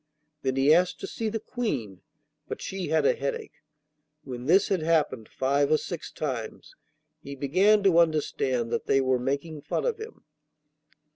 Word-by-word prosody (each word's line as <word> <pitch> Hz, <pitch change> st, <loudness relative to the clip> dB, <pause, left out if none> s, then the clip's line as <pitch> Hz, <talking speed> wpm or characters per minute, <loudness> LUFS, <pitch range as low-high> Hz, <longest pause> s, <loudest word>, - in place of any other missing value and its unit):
Then 130 Hz, -1 st, -1 dB
he 135 Hz, +3 st, +5 dB
asked 180 Hz, +2 st, +2 dB
to -, -, -3 dB
see 225 Hz, -1 st, -3 dB
the 225 Hz, +1 st, -3 dB
Queen, 140 Hz, -, -4 dB, 0.5 s
but -, -, -5 dB
she 190 Hz, -2 st, -4 dB
had 160 Hz, -2 st, +2 dB
a -, -, +5 dB
headache. 140 Hz, 0 st, -5 dB, 0.6 s
When 125 Hz, -2 st, -7 dB
this 190 Hz, +5 st, +4 dB
had 190 Hz, -4 st, +1 dB
happened 155 Hz, -8 st, +1 dB
five 140 Hz, +2 st, +1 dB
or 155 Hz, -, +5 dB
six 170 Hz, +2 st, -6 dB
times, 125 Hz, -7 st, -5 dB, 0.5 s
he 140 Hz, -, -8 dB
began 190 Hz, +10 st, +3 dB
to 180 Hz, -4 st, +5 dB
understand 135 Hz, -7 st, +1 dB
that -, -, -2 dB
they 135 Hz, -, +4 dB
were 130 Hz, -1 st, +2 dB
making 140 Hz, +4 st, -3 dB
fun 145 Hz, -, -2 dB
of 465 Hz, -2 st, -1 dB
him. 440 Hz, +1 st, -10 dB
150 Hz, 165 wpm, -27 LUFS, 130-185 Hz, 0.6 s, he